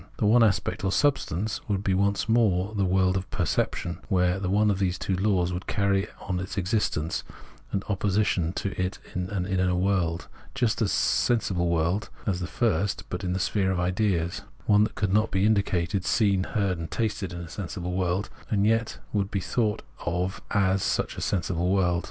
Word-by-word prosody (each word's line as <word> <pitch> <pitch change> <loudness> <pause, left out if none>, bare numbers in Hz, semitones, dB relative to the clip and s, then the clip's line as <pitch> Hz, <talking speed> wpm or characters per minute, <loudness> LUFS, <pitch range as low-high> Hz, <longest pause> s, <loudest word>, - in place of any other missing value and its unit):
The - - 0
one 115 +3 +5
aspect 100 -3 +1
or 95 - +1
substance 110 - 0
would 100 -1 0
be 95 - +1
once 100 +2 +1
more 105 -4 +2
the 100 -2 +1
world 95 0 +2
of 95 -1 -3
perception, 85 0 -1
where 90 0 +2
the 95 -2 -2
one 105 +2 +3
of 95 - -1
those 90 -2 0
two 95 - -1
laws 90 -2 +1
would 90 +1 -5
carry 100 -1 +1
on 90 -2 -2
its 95 +2 -5
existence, 90 -5 0 0.5
and 100 - -1
in - - -20
opposition 100 -4 +1
to 100 - -2
it 90 +2 -3 0.2
an 90 +1 -2
inner 90 -1 +1
world, 90 -3 0 0.3
just 120 -5 +1
such 110 - +2
a - - -2
sensible 95 -8 +1
world 85 +5 0 0.2
as 95 -4 0
the 90 - -3
first, 100 -4 0
but 90 +2 -4
in 90 -1 -1
the 95 - -1
sphere 95 0 +1
of 90 - -1
ideas; 90 -2 0 0.2
one 105 0 +5
that - - -6
could 100 -2 0
not 110 +1 +3
be 95 +1 +1
indicated, 100 -4 +1
seen, 100 -4 +2
heard, 100 -5 -1
and 80 -1 -5
tasted 105 -3 -2
as 85 -1 -6
a 85 - -7
sensible 90 0 -5
world, 90 +2 -1 0.2
and 100 -2 +2
yet 115 +1 +1 0.2
would 100 -2 0
be 100 - -1
thought 105 +2 -1 0.2
of 90 +2 -2
as 95 -1 +2
such - - 0
a - - -6
sensible 90 -2 0
world. 90 -3 +2
95 Hz, 195 wpm, -26 LUFS, 90-105 Hz, 0.5 s, one